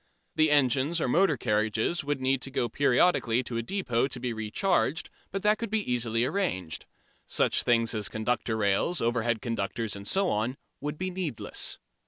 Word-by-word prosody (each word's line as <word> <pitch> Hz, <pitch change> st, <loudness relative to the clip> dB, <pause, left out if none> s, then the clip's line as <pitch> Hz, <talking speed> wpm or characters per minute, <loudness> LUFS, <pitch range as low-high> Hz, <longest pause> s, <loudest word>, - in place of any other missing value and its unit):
The 155 Hz, 0 st, +3 dB
engines 145 Hz, +3 st, +3 dB
or -, -, 0 dB
motor 160 Hz, +2 st, +3 dB
carriages 110 Hz, +7 st, 0 dB
would 145 Hz, -1 st, -1 dB
need 130 Hz, 0 st, +1 dB
to 135 Hz, -, -4 dB
go 125 Hz, -3 st, 0 dB
periodically 130 Hz, -1 st, +2 dB
to 120 Hz, -1 st, -4 dB
a -, -, 0 dB
depot 120 Hz, -, 0 dB
to 130 Hz, -2 st, -5 dB
be 125 Hz, -1 st, -2 dB
re 110 Hz, -1 st, -5 dB
charged, 175 Hz, -, +1 dB, 0.2 s
but 195 Hz, 0 st, -4 dB
that 210 Hz, 0 st, +3 dB
could 230 Hz, -2 st, -4 dB
easily 120 Hz, -, 0 dB
be -, -, +3 dB
arranged. 95 Hz, -, -2 dB, 0.4 s
Such -, -, +2 dB
things 115 Hz, -1 st, +2 dB
as 105 Hz, -2 st, -1 dB
conductor 110 Hz, 0 st, -1 dB
rails, 105 Hz, -, +1 dB
overhead 115 Hz, -1 st, 0 dB
conductors 115 Hz, -1 st, -2 dB
and 100 Hz, 0 st, -8 dB
so 195 Hz, -1 st, +2 dB
on 115 Hz, +5 st, -1 dB, 0.2 s
would 150 Hz, +1 st, -4 dB
be 185 Hz, +2 st, -3 dB
needless. 175 Hz, -10 st, -3 dB
125 Hz, 180 wpm, -28 LUFS, 115-155 Hz, 0.4 s, The